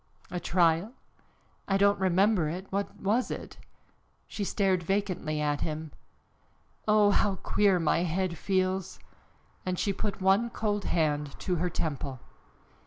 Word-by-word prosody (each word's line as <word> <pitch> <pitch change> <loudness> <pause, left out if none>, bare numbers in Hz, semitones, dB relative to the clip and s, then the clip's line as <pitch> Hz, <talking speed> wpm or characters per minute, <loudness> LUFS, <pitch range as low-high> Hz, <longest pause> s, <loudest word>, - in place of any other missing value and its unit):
"A 180 - -2
trial? 170 +4 +2 0.7
I 195 - +2
don't 200 0 +3
remember 190 -2 +3
it. 180 +4 -5
What 200 0 -2
was 220 +6 0
it?" - - -6 0.7
She 205 - -5
stared 190 -2 +1
vacantly 185 -4 -1
at 145 -1 0
him. 155 -1 -4 1.0
"Oh, 210 -1 +5
how 200 -1 +2
queer 195 +1 +2
my 165 0 +2
head 175 +1 -1
feels!" 190 0 -1 0.7
And 185 -1 -2
she 200 - 0
put 205 +1 -3
one 195 +5 +3
cold 205 -3 -2
hand 150 -3 0
to 180 -2 0
her 180 +2 0
temple. 140 -5 -3
185 Hz, 135 wpm, -29 LUFS, 165-200 Hz, 1.0 s, Oh